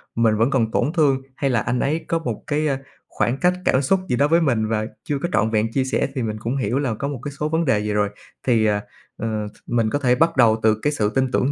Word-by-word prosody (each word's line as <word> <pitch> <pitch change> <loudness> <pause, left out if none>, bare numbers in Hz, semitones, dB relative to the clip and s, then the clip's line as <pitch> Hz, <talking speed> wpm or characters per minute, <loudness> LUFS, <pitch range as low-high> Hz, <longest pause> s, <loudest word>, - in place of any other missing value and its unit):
mình 115 -2 +3
vẫn 115 +4 +3
còn 115 -5 +1
tổn 150 - 0
thương 145 -6 +2
hay 140 - 0
là 120 - +2
anh 125 +3 -1
ấy 155 +6 -1
có 165 - 0
một 120 -10 -4
cái, 150 +1 0
a, 140 -2 0 0.3
khoảng 125 +3 -1
cách 180 +2 +3
cảm 130 - +3
xúc 190 +8 +2
gì - - +2
đó 140 +4 +3
với 165 +3 +3
mình 120 -8 +1
và 110 -1 -1 0.2
chưa 145 -2 -2
có 175 - 0
trọn 110 +2 +2
vẹn 110 0 0
chia 135 - +2
sẻ, 130 - 0
thì 130 - -1
mình 110 -1 -3
cũng 115 +4 -2
hiểu 125 +1 0
là 135 -5 -1
có 140 +6 -3
một 140 -3 -4
cái 145 - -4
số 150 +1 -1
vấn 160 +1 0
đề 130 -7 +2
gì 105 0 -2
rồi. 105 -1 +1 0.4
Thì, 115 -3 +3
à, 105 -1 +1 0.4
ờ, 110 -1 -3
th 105 - -14
mình 115 -2 +1
có 145 - -1
thể 125 -3 +3
bắt 165 +2 +2
đầu 115 -2 +5
từ 110 -1 +4
cái 150 - +1
sự 105 -7 +1
tin 130 -1 +1
tưởng 130 +2 +1
125 Hz, 285 wpm, -22 LUFS, 110-145 Hz, 0.4 s, đầu